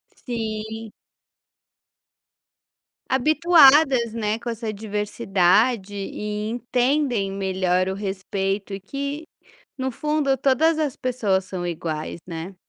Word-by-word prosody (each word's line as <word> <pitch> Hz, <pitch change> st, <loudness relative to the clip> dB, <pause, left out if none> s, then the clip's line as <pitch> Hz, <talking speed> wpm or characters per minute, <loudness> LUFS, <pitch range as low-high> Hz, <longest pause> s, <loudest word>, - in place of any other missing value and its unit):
Sim. 220 Hz, -2 st, -5 dB, 2.2 s
Habituadas, 275 Hz, -4 st, +5 dB
né, 220 Hz, -1 st, -1 dB
com 235 Hz, +1 st, -5 dB
essa 225 Hz, -1 st, -3 dB
diversidade, 205 Hz, 0 st, +1 dB
e 210 Hz, +2 st, -4 dB
entendem 245 Hz, -3 st, 0 dB
melhor 185 Hz, -1 st, 0 dB
o 190 Hz, -, -1 dB
respeito. 195 Hz, 0 st, -3 dB
E 195 Hz, -, -4 dB
que, 280 Hz, -, -5 dB, 0.5 s
no 260 Hz, 0 st, -2 dB
fundo, 295 Hz, 0 st, 0 dB
todas 280 Hz, +5 st, +3 dB
as 295 Hz, -4 st, -1 dB
pessoas 215 Hz, -9 st, 0 dB
são 185 Hz, -2 st, -5 dB
iguais, 165 Hz, -1 st, -4 dB
né. 175 Hz, +2 st, -6 dB
220 Hz, 100 wpm, -23 LUFS, 195-265 Hz, 2.2 s, Habituadas